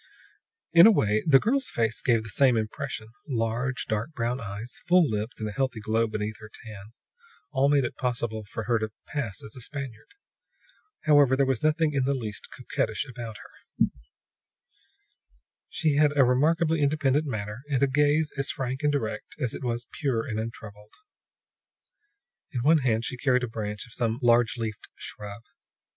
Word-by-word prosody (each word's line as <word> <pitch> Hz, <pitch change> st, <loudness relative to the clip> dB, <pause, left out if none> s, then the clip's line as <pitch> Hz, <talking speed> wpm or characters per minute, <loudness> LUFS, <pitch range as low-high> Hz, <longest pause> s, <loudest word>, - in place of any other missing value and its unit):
In 170 Hz, +4 st, +10 dB
a -, -, +8 dB
way, 110 Hz, -, +2 dB
the 135 Hz, -3 st, +7 dB
girl's 265 Hz, -, +1 dB
face 110 Hz, -2 st, 0 dB
gave 115 Hz, -3 st, +2 dB
the 110 Hz, -, -7 dB
same 125 Hz, +3 st, +4 dB
impression. 110 Hz, +1 st, -4 dB, 0.2 s
Large, 125 Hz, 0 st, -1 dB
dark 110 Hz, +7 st, -2 dB
brown 120 Hz, -1 st, -1 dB
eyes, 105 Hz, +3 st, -7 dB
full 175 Hz, -2 st, +5 dB
lips 110 Hz, 0 st, -3 dB
and 110 Hz, -, -2 dB
a -, -, -4 dB
healthy 130 Hz, +1 st, -1 dB
glow 110 Hz, +2 st, +1 dB
beneath 110 Hz, 0 st, -4 dB
her 110 Hz, -1 st, -11 dB
tan, 105 Hz, -4 st, -10 dB, 0.7 s
all 140 Hz, -1 st, +3 dB
made 145 Hz, -1 st, +4 dB
it -, -, -5 dB
possible 120 Hz, -3 st, -2 dB
for 115 Hz, -, -4 dB
her 115 Hz, +1 st, +1 dB
to 110 Hz, 0 st, -2 dB, 0.2 s
pass 130 Hz, -10 st, -4 dB
as 110 Hz, -, -7 dB
a 125 Hz, -, -8 dB
Spaniard. 135 Hz, -3 st, -6 dB, 0.9 s
However, 145 Hz, -4 st, +5 dB
there 135 Hz, +1 st, +3 dB
was 130 Hz, -3 st, 0 dB
nothing 155 Hz, 0 st, +2 dB
in 135 Hz, -2 st, +1 dB
the 140 Hz, +1 st, +1 dB
least 110 Hz, -5 st, -5 dB
coquettish -, -, -2 dB
about 120 Hz, -3 st, -7 dB
her; -, -, -3 dB, 1.8 s
she 150 Hz, -3 st, +1 dB
had 150 Hz, -1 st, +3 dB
a 135 Hz, -, +7 dB
remarkably 155 Hz, +5 st, +2 dB
independent 145 Hz, 0 st, +2 dB
manner, 105 Hz, -2 st, -4 dB
and 140 Hz, -2 st, +1 dB
a -, -, +5 dB
gaze 150 Hz, +3 st, +2 dB
as 140 Hz, -1 st, -1 dB
frank 130 Hz, +1 st, -3 dB
and 150 Hz, -1 st, +2 dB
direct 135 Hz, -7 st, -3 dB
as 125 Hz, -5 st, -1 dB
it -, -, -7 dB
was 120 Hz, -1 st, -2 dB
pure 130 Hz, -7 st, -1 dB
and 110 Hz, -1 st, -3 dB
untroubled. 105 Hz, -2 st, -8 dB, 1.6 s
In 125 Hz, -6 st, -2 dB
one 155 Hz, +5 st, +5 dB
hand 115 Hz, -4 st, +1 dB
she 125 Hz, -, -4 dB
carried 125 Hz, -1 st, +2 dB
a -, -, 0 dB
branch 105 Hz, -2 st, -4 dB
from 115 Hz, -, -14 dB
some 115 Hz, 0 st, -1 dB
large 120 Hz, -1 st, +4 dB
leafed 110 Hz, -2 st, -5 dB
shrub. 105 Hz, +1 st, -8 dB
125 Hz, 175 wpm, -27 LUFS, 110-140 Hz, 1.8 s, In